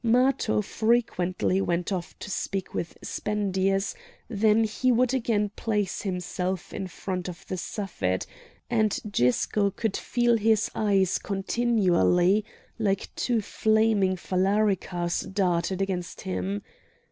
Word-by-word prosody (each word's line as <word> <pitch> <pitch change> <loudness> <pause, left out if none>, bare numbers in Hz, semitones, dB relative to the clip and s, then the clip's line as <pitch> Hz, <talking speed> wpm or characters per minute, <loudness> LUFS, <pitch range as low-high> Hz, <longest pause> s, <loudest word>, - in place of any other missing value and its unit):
Matho 245 -2 +3
frequently 195 -5 +1
went 175 0 -1
off 180 -3 -4
to 205 - -7
speak 195 -1 -3
with 170 - -4
Spendius; 195 -2 0 0.3
then 220 0 +3
he 220 +4 +1
would 250 +1 +3
again 220 -5 +1
place 210 -4 -1
himself 180 -1 -3
in 190 - -4
front 185 0 -4
of 175 - -10
the - - -3
Suffet, 170 - -2 0.4
and 220 -3 +1
Gisco 200 - +2
could 210 +1 -2
feel 240 -1 +2
his 220 -1 +2
eyes 195 -4 +2
continually 195 -2 +2 0.4
like 200 -3 -1
two 235 -3 +1
flaming 215 -3 +2
phalaricas 185 -2 0
darted 185 -1 +1
against 180 -3 -4
him. 95 +2 -3
195 Hz, 115 wpm, -27 LUFS, 180-220 Hz, 0.4 s, Matho